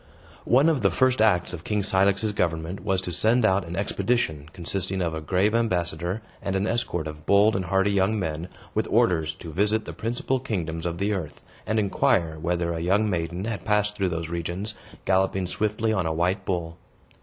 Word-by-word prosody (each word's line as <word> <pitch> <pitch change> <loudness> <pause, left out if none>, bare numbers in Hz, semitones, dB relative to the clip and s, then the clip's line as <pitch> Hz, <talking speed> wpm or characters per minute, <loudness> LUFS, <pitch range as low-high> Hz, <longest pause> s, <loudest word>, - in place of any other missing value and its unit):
One 135 +6 +5
of 155 -6 +2
the 100 - +4
first 130 +6 +2
acts 95 -4 +3
of 85 -2 -6
King 105 +1 -1
Cilix's 100 +2 +2
government 85 0 -1
was 95 -1 0
to 90 - -4
send 110 +6 +3
out 95 -3 +2
an 85 - -5
expedition, 95 -6 -1
consisting 95 +2 -3
of 85 -3 -1
a 80 - -4
grave 95 +7 +1
ambassador, 90 -3 -1 0.2
and 95 - -2
an 95 +1 +1
escort 105 -8 -1
of 75 0 -8
bold 100 +2 +5
and 95 -1 -1
hardy 95 +2 +2
young 100 +2 +2
men, 80 -1 -3 0.3
with - - 0
orders 80 -2 +2
to 85 - -9
visit 105 +5 +1
the - - -6
principal 120 +3 -1
kingdoms 85 -9 -3
of 85 0 -3
the 100 +3 0
earth, 90 -7 -5 0.2
and 110 - 0
inquire 85 -5 +1
whether 85 0 0
a 80 - -3
young 100 +5 +2
maiden 85 +2 -2
had 105 -5 -4
passed 105 0 +1
through 95 -3 0
those 85 -1 -3
regions, 85 +5 -3 0.3
galloping 95 0 +2
swiftly 110 +4 0
on 95 -6 0
a 80 - 0
white 90 +4 0
bull. 85 -2 -3
95 Hz, 195 wpm, -25 LUFS, 85-105 Hz, 0.3 s, One